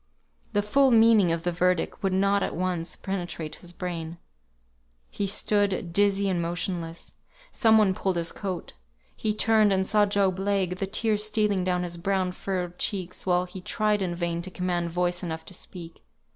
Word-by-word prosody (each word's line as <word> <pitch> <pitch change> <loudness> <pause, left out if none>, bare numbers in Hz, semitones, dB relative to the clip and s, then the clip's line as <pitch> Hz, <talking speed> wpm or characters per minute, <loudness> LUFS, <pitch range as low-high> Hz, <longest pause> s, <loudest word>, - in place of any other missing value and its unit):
The 205 - +2
full 270 +6 +4
meaning 225 -6 +5
of 165 0 -1
the 175 - 0
verdict 180 0 0
could 195 - 0
not 200 +2 +2
at - - -2
once 180 -1 -2
penetrate 175 -5 -5
his 175 - -7
brain. 170 -2 -5 0.9
He 200 - -2
stood 200 -3 0
dizzy 200 0 +3
and 180 -3 0
motionless. 170 0 -4 0.4
Some 225 -4 +4
one 205 -3 +4
pulled 190 0 -1
his 170 -1 0
coat. 185 -4 -5 0.4
He 215 - -1
turned, 215 -1 +3
and 190 0 +2
saw 210 +1 +3
Job 195 -2 +1
Legh, 195 -2 0
the 195 - -2
tears 210 +1 +1
stealing 210 -3 +1
down 180 -1 0
his 175 -1 -4
brown 185 +1 0
furrowed 180 -1 -4
cheeks, 185 -2 -3
while 180 0 +2
he 185 +1 -9
tried 210 +1 0
in 175 -2 -1
vain 170 -1 -2
to 185 - -4
command 180 -2 -2
voice 175 +1 -1
enough 160 -3 -5
to - - -9
speak. 170 -2 -9
185 Hz, 175 wpm, -26 LUFS, 175-200 Hz, 0.9 s, meaning